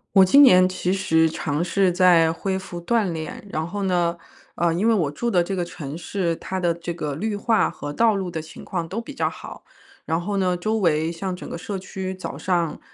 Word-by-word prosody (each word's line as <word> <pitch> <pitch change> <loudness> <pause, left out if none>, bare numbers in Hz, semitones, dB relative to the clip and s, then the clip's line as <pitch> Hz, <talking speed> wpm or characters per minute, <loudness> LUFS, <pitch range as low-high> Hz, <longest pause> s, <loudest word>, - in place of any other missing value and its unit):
我 190 - +8
今 280 +10 +7
年 185 -8 +7
其 185 -1 -2
实 160 -4 +3
尝 150 -1 -2
试 185 +1 +2
在 175 -3 +5
恢 190 +3 -2
复 175 -2 -7
锻 205 0 +1
炼。 160 +4 -6
然 155 - -1
后 200 +4 -4
呢 175 -3 +1 0.4
呃， 170 -1 +1
因 200 +7 +1
为 230 - +5
我 165 -9 +1
住 235 +11 -2
的 175 -5 +3
这 195 - -3
个 180 - -1
城 150 -4 -7
市， 175 0 -2
它 190 - -5
的 175 -2 +1
这 170 +1 -5
个 150 -4 -4
绿 205 +7 -2
化 220 +2 +2
和 145 - -6
道 225 +6 +3
路 190 -2 -3
的 165 -2 -4
情 160 - -12
况 170 -4 -3
都 205 +7 -3
比 260 - -9
较 - - 0
好。 - - -10 0.4
然 160 - 0
后 200 +3 -2
呢， 180 -2 +1
周 215 +5 -1
围 165 -4 +1
像 180 +2 -4
整 - - -9
个 - - -5
社 200 +2 -5
区 190 0 -5
早 185 - -7
上， 170 -4 -1
180 Hz, 245 characters per minute, -23 LUFS, 165-195 Hz, 0.4 s, 我